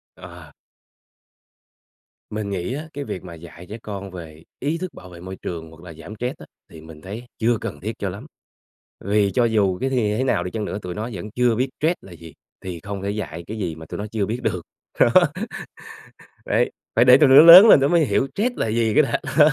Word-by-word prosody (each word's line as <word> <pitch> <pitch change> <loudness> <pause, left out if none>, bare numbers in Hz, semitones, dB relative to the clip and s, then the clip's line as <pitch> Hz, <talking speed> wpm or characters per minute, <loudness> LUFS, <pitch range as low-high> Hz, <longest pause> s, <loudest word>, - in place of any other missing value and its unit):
Ờ. - - -13 1.8
Mình 105 -1 -4
nghĩ 95 +5 -3
á, 155 +3 -6
cái 145 0 -5
việc 95 - -6
mà 85 -2 -10
dạy 85 +1 -12
trẻ 110 - -6
con 100 -2 -7
về 80 -3 -11 0.2
ý 150 +5 -1
thức 185 0 -6
bảo 90 - -13
vệ 85 -1 -12
môi 95 +2 -8
trường 80 -2 -6
hoặc 80 0 -16
là 85 -2 -10
giảm 80 +7 -11
stress 125 +3 -4
á - - -11 0.2
thì 80 - -13
mình 80 -1 -13
thấy 110 +6 -8
chưa 115 0 +2
cần 75 - -6
thiết 110 +4 -4
cho 100 - -2
lắm, 100 +4 -9 0.8
vì 100 -1 +2
cho 120 -2 +2
dù 100 -5 +1
cái 135 - -1
thì 110 -5 0
thế 130 - 0
nào 90 -9 0
đi 90 - -5
chăng 110 -2 -4
nữa, 100 - -5
tụi 90 -1 -6
nó 110 +3 -4
vẫn 100 +3 -7
chưa 125 -1 +1
biết 130 +3 -1
stress 165 +4 +1
là 95 - -14
gì, 85 -2 -12 0.3
thì 90 -3 -6
không 100 +2 -6
thể 100 +1 -2
dạy 85 -5 -6
cái 110 +2 -6
gì 85 -6 -3
mà 80 0 -11
tụi - - -7
nó 105 - -4
chưa 105 -3 -1
biết 115 +4 -4
được, 90 - -1 0.4
đó. - - +6 1.4
Đấy, - - +1 0.2
phải 120 +2 +5
để 125 0 +8
tụi 145 -3 +5
nó 135 - +7
lớn 175 +6 +11
lên 145 - +8
tụi 140 +2 +2
nó - - -2
mới 165 -3 +4
hiểu 135 - 0
stress 240 +5 -1
là - - -1
gì 110 0 0
cái 155 - +5
đã, - - -1 0.2
đó. 150 +1 +8
105 Hz, 240 wpm, -22 LUFS, 90-125 Hz, 1.8 s, lớn